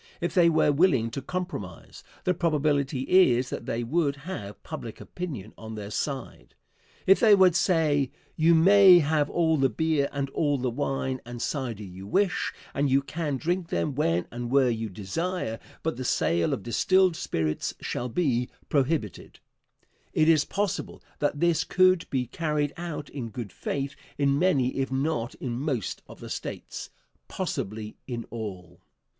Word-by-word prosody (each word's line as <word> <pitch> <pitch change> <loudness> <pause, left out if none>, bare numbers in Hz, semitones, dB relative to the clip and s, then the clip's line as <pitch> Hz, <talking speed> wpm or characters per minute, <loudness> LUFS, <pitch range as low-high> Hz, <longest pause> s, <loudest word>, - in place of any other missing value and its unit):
If - - -2
they 175 -3 +5
were 160 -2 +3
willing 140 -7 +3
to 135 - -4
compromise, 140 - -6 0.2
the 185 - +2
probability 150 -5 +1
is 130 -6 +4
that - - -5
they 120 +1 -1
would 140 +3 +1
have 105 - -7
public - - -7
opinion 130 - -6
on 110 0 -7
their 105 -1 -6
side. 135 +2 -4 0.5
If 195 - +6
they 215 -3 +7
would 185 -3 +5
say: 155 -7 +2 0.3
"You 165 +2 +4
may 190 +2 +8
have 150 -2 +2
all 160 -2 +2
the 135 -1 +3
beer 150 +3 +1
and 140 -1 -2
all 145 -1 +1
the 125 -1 -1
wine 130 0 -2
and 120 0 -8
cider 120 -5 -3
you 95 0 -9
wish, 190 - +1 0.2
and 140 0 +1
you 135 +1 +3
can 145 0 -3
drink 175 +4 -1
them 150 - -1
when 85 - +1
and 120 0 -5
where 130 -1 +4
you 115 -1 -3
desire, 115 - -3 0.2
but 160 -6 -1
the 130 - -4
sale 85 -8 +1
of 100 - -2
distilled 185 - +3
spirits 80 - -2
shall 125 +1 -3
be 125 -4 0 0.2
prohibited," 135 - -1 0.7
it 155 - +3
is 160 -2 +5
possible 200 -1 -3 0.2
that 145 0 0
this 170 -1 +3
could 185 0 +3
be 130 -2 0
carried 150 +2 -1
out 170 -4 -5
in 125 -5 -5
good 110 -3 -6
faith 140 0 -3 0.2
in 140 0 +2
many 140 -9 +2
if 135 0 -1
not 135 -3 -1
in 120 -2 -4
most 130 - -2
of - - -13
the - - -8
States - - -6 0.4
possibly 105 +2 -4
in 120 -3 -4
all. 95 -6 -7
140 Hz, 160 wpm, -27 LUFS, 120-165 Hz, 0.7 s, may